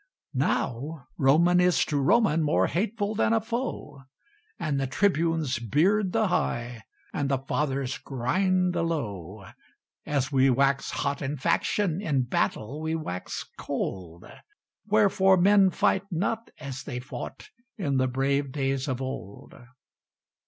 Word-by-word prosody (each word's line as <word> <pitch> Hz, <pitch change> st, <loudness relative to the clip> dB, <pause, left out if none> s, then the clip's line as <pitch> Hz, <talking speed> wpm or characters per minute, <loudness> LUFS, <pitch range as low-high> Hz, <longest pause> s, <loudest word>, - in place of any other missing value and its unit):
Now 135 Hz, +4 st, -1 dB
Roman 170 Hz, +6 st, +5 dB
is 180 Hz, -1 st, +3 dB
to 150 Hz, -, -1 dB
Roman 165 Hz, -, +3 dB
More 150 Hz, -1 st, +2 dB
hateful 205 Hz, +3 st, -1 dB
than 225 Hz, +1 st, +2 dB
a 225 Hz, -, +4 dB
foe, 225 Hz, -, -4 dB, 0.6 s
And 150 Hz, -4 st, -1 dB
the 135 Hz, -, -1 dB
Tribunes 165 Hz, -, +1 dB
beard 180 Hz, -, +2 dB
the 220 Hz, -1 st, +1 dB
high, 120 Hz, -8 st, -1 dB, 0.3 s
And 140 Hz, -1 st, -1 dB
the 135 Hz, -, +2 dB
Fathers 135 Hz, -1 st, -2 dB
grind 180 Hz, +8 st, 0 dB
the 170 Hz, -, 0 dB
low. 105 Hz, -, -4 dB, 0.6 s
As 140 Hz, -1 st, -1 dB
we 135 Hz, -1 st, +4 dB
wax 135 Hz, +2 st, +2 dB
hot 140 Hz, 0 st, -2 dB
in 145 Hz, +1 st, -3 dB
faction, 170 Hz, +4 st, 0 dB
In 140 Hz, -9 st, +1 dB
battle 125 Hz, +3 st, -2 dB
we 160 Hz, +1 st, -1 dB
wax 90 Hz, -, -5 dB
cold: 85 Hz, -2 st, -4 dB, 0.6 s
Wherefore 195 Hz, -3 st, +4 dB
men 195 Hz, +1 st, +5 dB
fight 190 Hz, +2 st, +1 dB
not 200 Hz, +6 st, -2 dB
as 135 Hz, -3 st, -6 dB
they 130 Hz, -3 st, -5 dB
fought 140 Hz, -, -8 dB, 0.3 s
In 145 Hz, -10 st, 0 dB
the 130 Hz, 0 st, +2 dB
brave 135 Hz, +2 st, 0 dB
days 135 Hz, 0 st, -1 dB
of 130 Hz, -1 st, -2 dB
old. 120 Hz, -6 st, -7 dB
145 Hz, 135 wpm, -27 LUFS, 130-185 Hz, 0.6 s, Roman